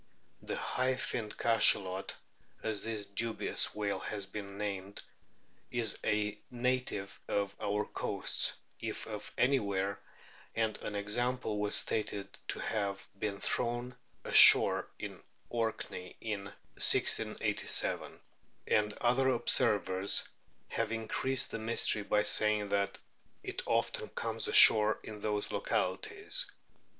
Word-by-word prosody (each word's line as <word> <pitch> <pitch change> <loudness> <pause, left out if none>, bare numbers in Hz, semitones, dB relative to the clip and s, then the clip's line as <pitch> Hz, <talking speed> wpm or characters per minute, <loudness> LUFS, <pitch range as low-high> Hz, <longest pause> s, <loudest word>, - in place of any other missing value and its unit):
The - - -4
" - - -6 0.2
High 130 0 +1
finned 110 -4 -4
Cachalot," 95 -4 +3 0.5
as 110 -2 -1
this 110 -2 -3
dubious 110 +3 +1
whale 105 -1 -1
has 100 -2 -4
been 100 0 -8
termed, 100 -1 -5 0.7
is 115 -3 0
a 105 0 0
native 125 -5 -2
of 100 -1 -1
our 105 +1 -1
coasts - - 0 0.3
if - - -4
of 105 -1 -7
anywhere, 100 -7 +1 0.6
and 110 -1 0
an 105 - -5
example 110 +2 -1
was 105 0 +1
stated 105 -2 -1
to - - -2
have 100 -3 -3
been 100 -1 -3
thrown 120 +2 -2 0.3
ashore - - +7
in - - -7 0.3
Orkney 110 -5 -3
in 105 -3 -4
1687, 100 - 0 0.5
and 105 0 +2
other 125 +4 +2
observers 100 -5 +3 0.4
have - - -2
increased 115 +3 0
the 115 - -4
mystery 110 -1 +2
by 105 +1 +1
saying 105 -1 +2
that 100 0 0 0.5
it - - -4
often 115 -1 0
comes 115 -1 -2
ashore 110 0 +7
in 105 -1 -8
those 105 0 -2
localities. 435 +3 -2
105 Hz, 115 wpm, -32 LUFS, 100-115 Hz, 0.7 s, ashore